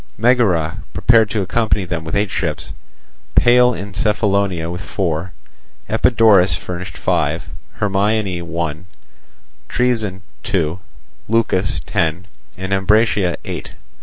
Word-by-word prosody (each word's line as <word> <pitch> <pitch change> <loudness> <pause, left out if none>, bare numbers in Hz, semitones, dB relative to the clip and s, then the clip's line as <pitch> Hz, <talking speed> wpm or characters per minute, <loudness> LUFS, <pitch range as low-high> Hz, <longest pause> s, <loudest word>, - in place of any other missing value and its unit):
Megara 100 -9 +2
prepared 115 -3 +4
to 100 -1 -1
accompany 105 0 0
them 85 -2 -4
with 80 +3 -4
eight 100 -1 0
ships, 80 -6 -3 0.6
Pale 125 0 +5
in 100 +1 -7
Cephallonia 100 -4 0
with 90 +1 -5
four; 90 -2 -2 0.6
Epidaurus 110 -4 +4
furnished 90 -1 -6
five, - - -1 0.2
Hermione 100 -2 0
one, 85 0 -4 0.8
Troezen 110 -6 0 0.2
two, 90 -5 -1 0.5
Leucas 100 -8 +1
ten, 85 +4 -1 0.3
and 95 +1 -3
Ambracia 95 -2 +2
eight. - - -6
95 Hz, 105 wpm, -18 LUFS, 85-110 Hz, 0.8 s, Pale